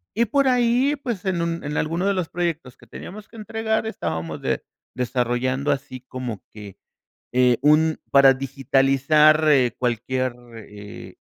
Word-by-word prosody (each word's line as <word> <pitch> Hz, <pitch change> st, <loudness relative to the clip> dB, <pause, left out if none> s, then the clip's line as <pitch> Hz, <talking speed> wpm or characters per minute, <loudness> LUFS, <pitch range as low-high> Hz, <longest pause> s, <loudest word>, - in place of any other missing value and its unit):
Y 235 Hz, +2 st, +2 dB
por 275 Hz, +5 st, +1 dB
ahí, 250 Hz, +3 st, +2 dB
pues, 240 Hz, -9 st, -5 dB
en 185 Hz, -3 st, 0 dB
un 170 Hz, 0 st, -3 dB
en 145 Hz, 0 st, -4 dB
alguno 165 Hz, +4 st, -1 dB
de 200 Hz, -, +2 dB
los 185 Hz, -4 st, -2 dB
proyectos 165 Hz, -7 st, -3 dB
que -, -, -18 dB
teníamos 210 Hz, -, -10 dB
que -, -, -19 dB
entregar 220 Hz, +1 st, -2 dB
estábamos 80 Hz, -, -4 dB
de -, -, -2 dB, 0.3 s
desarrollando 125 Hz, +3 st, -1 dB
así 135 Hz, -2 st, -4 dB
como 125 Hz, -5 st, -7 dB
que, 105 Hz, -3 st, -11 dB, 0.5 s
eh, 125 Hz, -1 st, +3 dB
un 155 Hz, +2 st, +3 dB
para 140 Hz, -1 st, +7 dB
digitalizar, 135 Hz, +3 st, +3 dB
eh, 130 Hz, -5 st, +3 dB
cualquier, 130 Hz, +1 st, -1 dB, 0.2 s
eh, 105 Hz, -1 st, -11 dB
145 Hz, 150 wpm, -22 LUFS, 125-185 Hz, 0.5 s, para